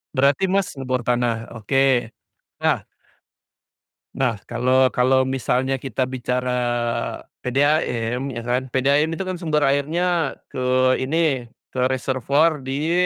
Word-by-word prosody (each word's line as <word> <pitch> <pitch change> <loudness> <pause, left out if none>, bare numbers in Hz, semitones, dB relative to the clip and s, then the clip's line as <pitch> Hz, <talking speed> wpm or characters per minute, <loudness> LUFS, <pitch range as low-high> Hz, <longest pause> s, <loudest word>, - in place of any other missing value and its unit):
Berarti 140 +6 +3
Mas, 195 -4 0
ngebor 130 -2 -2
tanah? 120 -2 0
Oke. 125 +1 +1 0.5
Nah - - +1 1.3
Nah, 125 -4 +1
kalau 130 +2 +2
kalau 130 +1 +3
misalnya 130 0 0
kita 130 -1 -2
bicara 125 0 -2 0.9
PDAM, 125 -2 0
ya 115 - -5
kan. 125 +2 -1
PDAM 140 +4 +2
itu 190 - -3
kan 185 -1 -4
sumber 150 -4 +1
airnya 155 +3 +1 0.2
ke 130 -1 +2
ini 135 -3 0 0.2
ke 130 - -4
reservoir 135 +4 +1
di, 140 +5 -2
130 Hz, 115 wpm, -22 LUFS, 125-145 Hz, 1.3 s, Berarti